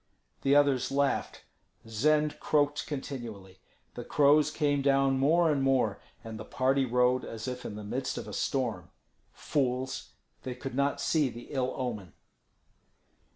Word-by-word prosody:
The 140 +1 +3
others 140 -3 +3
laughed. 140 0 0 0.4
Zend 150 +7 +1
croaked 145 -1 +1
continually. 115 -10 -7 0.3
The - - -6
crows 145 +1 +4
came 145 -2 0
down 135 -1 +3
more 160 +4 +4
and 140 -2 0
more, 130 -6 +1 0.2
and 110 -1 -7
the - - -6
party 130 +3 +1
rode 125 +1 +2
as 115 +2 -7
if 125 -1 -5
in 105 - -5
the 105 - -7
midst 130 +5 -3
of - - -6
a - - -8
storm. 115 -10 -2 0.4
Fools! 130 -2 -2 0.3
they 125 -1 -5
could 130 +1 -7
not 140 +2 0
see 150 -4 +1
the 120 0 -10
ill 130 -3 -1
omen. 105 - -4
135 Hz, 150 wpm, -29 LUFS, 125-140 Hz, 0.4 s, crows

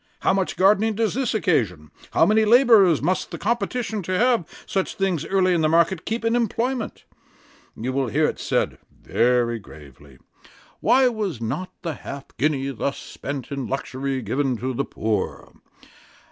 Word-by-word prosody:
How - - +3
much 190 -1 -1
gardening 210 +3 +3
does 225 0 0
this 255 -3 -1
occasion? 100 - 0 0.2
how - - +4
many 215 +4 +4
labourers 215 - +5
must 185 +4 0
the - - -6
competition 235 -1 -1
to 185 +1 -2
have 240 -5 +3 0.2
such 190 -1 -2
things 185 -5 -1
early 185 -1 +2
in 170 - +1
the 155 - +2
market, 170 +1 +2
keep 230 +1 -2
in 230 +1 +2
employment? 240 +1 -1 0.7
You 125 +4 -3
will 135 -1 0
hear 110 - +2
it - - -2
said, - - -1 0.2
very 120 -1 +1
gravely, 70 - -15 0.6
Why 260 0 +4
was 210 - -2
not 175 +11 -3
the 165 -3 -2
half 140 0 -9
guinea, 140 -1 0
thus 135 +2 -3
spent 140 -3 -7
in 140 -3 -3
luxury, 135 -1 -3
given 130 +3 0
to 130 +4 -3
the - - -1
poor? 105 -3 -3
170 Hz, 160 wpm, -23 LUFS, 130-215 Hz, 0.7 s, labourers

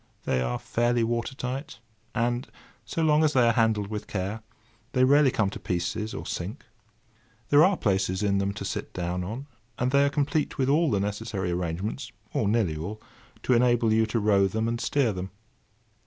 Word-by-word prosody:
They 65 - 0
are - - -1
fairly 120 0 +1
water 120 +3 -1
tight; 130 +2 -5 0.4
and 120 +2 0 0.4
so 165 - -2
long 155 0 +4
as 155 -1 +3
they 125 -2 +4
are 115 - +4
handled 110 -3 +2
with 105 -1 -5
care, 100 +3 -3 0.5
they 130 -2 +3
rarely 140 +2 +6
come 105 -5 0
to - - -7
pieces, 90 +5 -2
or - - -6
sink. - - -5 0.8
There 145 +2 +7
are 190 +1 +4
places 95 -1 0
in 100 -1 +2
them 100 0 0
to 105 - -6
sit - - -4
down 90 0 -2
on, 115 +9 -5 0.3
and 125 +1 0
they 140 +1 +5
are 140 - +3
complete 145 +1 -1
with 130 -1 +1
all 155 +3 +3
the 100 - +1
necessary 100 -2 -2
arrangements—or 100 +5 -3
nearly 105 -7 +1
all—to 105 +8 -5
enable 120 -2 +3
you 110 0 +3
to 115 +1 0
row 100 -2 +4
them 110 +4 -1
and 115 0 -2
steer 135 -7 +1
them. 95 0 -5
110 Hz, 185 wpm, -27 LUFS, 100-130 Hz, 0.8 s, There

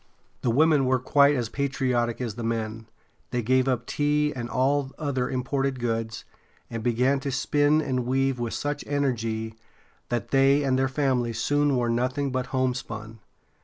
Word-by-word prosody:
The 125 - 0
women 150 +2 +4
were 130 0 +3
quite 140 +3 +4
as 120 -3 -1
patriotic 125 -3 -1
as 120 -4 -3
the 115 +2 -6
men. 115 -1 -3 0.4
They 120 -1 -2
gave 130 +3 +2
up 125 -2 0
tea 150 +2 +1
and 120 -1 -4
all 135 +3 +1
other 135 -5 -1
imported 135 +1 -1
goods, 115 -2 -3 0.5
and 115 -1 -4
began 125 +4 +2
to 135 0 -3
spin 145 +3 +2
and 125 -3 -2
weave 135 0 +1
with 120 -1 -2
such 145 0 -3
energy 115 -6 -1 0.6
that 120 -4 -2
they 135 +1 +4
and 130 -1 +1
their 135 - +2
families 130 -5 0
soon 145 +2 +2
wore 120 -1 +1
nothing 130 +4 0
but 130 0 -2
homespun. 115 -4 -3
130 Hz, 165 wpm, -26 LUFS, 120-140 Hz, 0.6 s, women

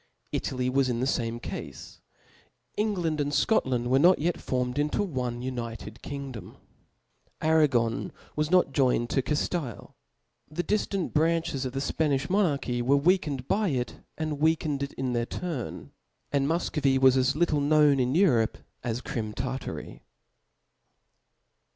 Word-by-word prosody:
Italy 125 -1 -1
was 130 0 +2
in 120 -1 -1
the 130 - +1
fame 120 -3 -1
cafe. - - -6 1.0
England 180 -8 0
and 145 0 -1
Scotland 130 - +1
were 135 - +5
not 180 +5 +6
yet 170 +3 -1
formed 125 +1 -1
into 150 +7 +1
one 125 -8 -3
united 115 -3 -5
kingdorh. 135 -7 -7 0.8
Arra^n 145 -8 +2 0.3
was 150 0 0
not 180 -5 +4
joined 125 -3 +2
to 135 - +2
Caftile; 150 - -3 0.6
the 155 +4 -3
diftant 200 -3 -1
branches 160 -3 +1
of 125 - -4
the 135 - -2
Spanilh 145 0 0
monarchy 145 -11 +1
were 135 +4 +3
weakened 145 -5 +1
by 210 0 +1
it> 125 -4 -2 0.2
and 155 -2 -3
weak 160 +1 +3
ened 145 -3 -2
it 140 - -3
in 130 -1 -2
their 120 0 0
turn; 165 -9 -5 0.4
and 140 -1 +1
Mufcovy 150 -4 +1
was 130 -1 +5
as 130 +1 +2
little 155 -2 +2
known 145 -1 +4
in 125 +2 +1
Europe, 130 - +3 0.3
as 120 0 -2
Crim 110 -4 -4
Tartary. 130 - -5
140 Hz, 145 wpm, -27 LUFS, 125-160 Hz, 1.0 s, not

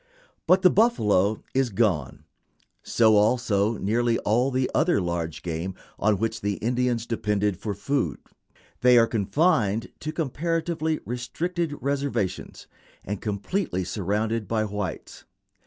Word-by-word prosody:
But 185 +2 +5
the 185 - +7
buffalo 110 - +2
is 130 -1 +2
gone; 95 - 0 0.6
so 110 -2 +3
also 110 -1 +2
nearly 115 +4 +1
all 120 +5 +1
the 130 -1 0
other 170 - +3
large 85 -3 -3
game 85 +2 -4 0.2
on 105 -1 +2
which 115 +2 -2
the 100 0 0
Indians 120 0 0
depended 105 -3 0
for 100 +2 -4
food. 100 - -1 0.6
They 125 0 +6
are 115 - +6
confined 115 - +1
to 155 - -4
comparatively 160 +1 -1
restricted 160 +7 -3
reservations, 135 -9 -2 0.4
and 100 0 -4
completely 105 - -2
surrounded 105 +3 -2
by 110 +1 0
whites. 105 -3 -5
115 Hz, 125 wpm, -25 LUFS, 100-135 Hz, 0.6 s, the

